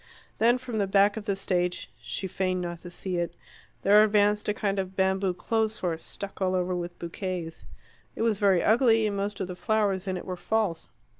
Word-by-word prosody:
Then 235 Hz, +3 st, +5 dB
from 245 Hz, -3 st, -4 dB
the 200 Hz, -, +1 dB
back 200 Hz, +1 st, +4 dB
of 220 Hz, -2 st, -6 dB
the 200 Hz, -3 st, 0 dB
stage 180 Hz, -2 st, -1 dB
she 115 Hz, -, -4 dB
feigned 185 Hz, 0 st, -1 dB
not 175 Hz, -1 st, -4 dB
to 175 Hz, -, -9 dB
see 180 Hz, +1 st, -3 dB
it 170 Hz, -1 st, -2 dB, 0.5 s
there 205 Hz, +2 st, +7 dB
advanced 210 Hz, 0 st, +2 dB
a -, -, +4 dB
kind 200 Hz, -2 st, -1 dB
of 190 Hz, 0 st, -4 dB
bamboo 190 Hz, -1 st, +1 dB
clothes 220 Hz, +2 st, 0 dB
horse, 165 Hz, -3 st, -2 dB
stuck 200 Hz, 0 st, -8 dB
all 185 Hz, 0 st, +2 dB
over 180 Hz, 0 st, 0 dB
with 175 Hz, 0 st, -5 dB
bouquets. 170 Hz, -1 st, -5 dB, 0.5 s
It -, -, -2 dB
was 220 Hz, -3 st, +1 dB
very 195 Hz, -4 st, +4 dB
ugly, 225 Hz, -1 st, +4 dB
and 205 Hz, -1 st, -1 dB
most 200 Hz, +1 st, -3 dB
of 190 Hz, -, -2 dB
the 180 Hz, -, -6 dB
flowers 200 Hz, -2 st, 0 dB
in 185 Hz, -1 st, -1 dB
it -, -, -7 dB
were 185 Hz, -, -4 dB
false. 200 Hz, -3 st, -1 dB
195 Hz, 210 wpm, -27 LUFS, 180-210 Hz, 0.5 s, there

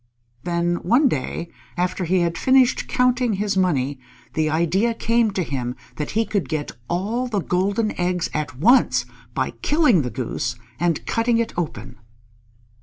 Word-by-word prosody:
Then 175 Hz, 0 st, 0 dB
one 255 Hz, -, +3 dB
day, 165 Hz, -, -3 dB, 0.3 s
after 180 Hz, +1 st, -1 dB
he 180 Hz, +2 st, +2 dB
had 170 Hz, -1 st, 0 dB
finished 260 Hz, +4 st, +3 dB
counting 250 Hz, -2 st, +2 dB
his 205 Hz, 0 st, -1 dB
money, 145 Hz, -8 st, +1 dB, 0.3 s
the 155 Hz, -1 st, +1 dB
idea 185 Hz, +9 st, +1 dB
came 230 Hz, 0 st, +2 dB
to 190 Hz, -, 0 dB
him 125 Hz, -5 st, -3 dB, 0.2 s
that 150 Hz, -, -3 dB
he 225 Hz, -, +3 dB
could 195 Hz, -13 st, -2 dB
get 155 Hz, -2 st, -2 dB, 0.2 s
all 215 Hz, +9 st, -1 dB
the 215 Hz, -5 st, -1 dB
golden 200 Hz, +5 st, 0 dB
eggs 180 Hz, -1 st, 0 dB
at 150 Hz, -4 st, -3 dB
once 235 Hz, -, +4 dB, 0.3 s
by -, -, 0 dB
killing 295 Hz, -, +4 dB
the 125 Hz, -, -3 dB
Goose 125 Hz, -1 st, -3 dB, 0.2 s
and 170 Hz, -2 st, 0 dB
cutting 230 Hz, 0 st, +1 dB
it 230 Hz, 0 st, -1 dB
open. 150 Hz, -11 st, -5 dB
180 Hz, 155 wpm, -22 LUFS, 155-230 Hz, 0.3 s, once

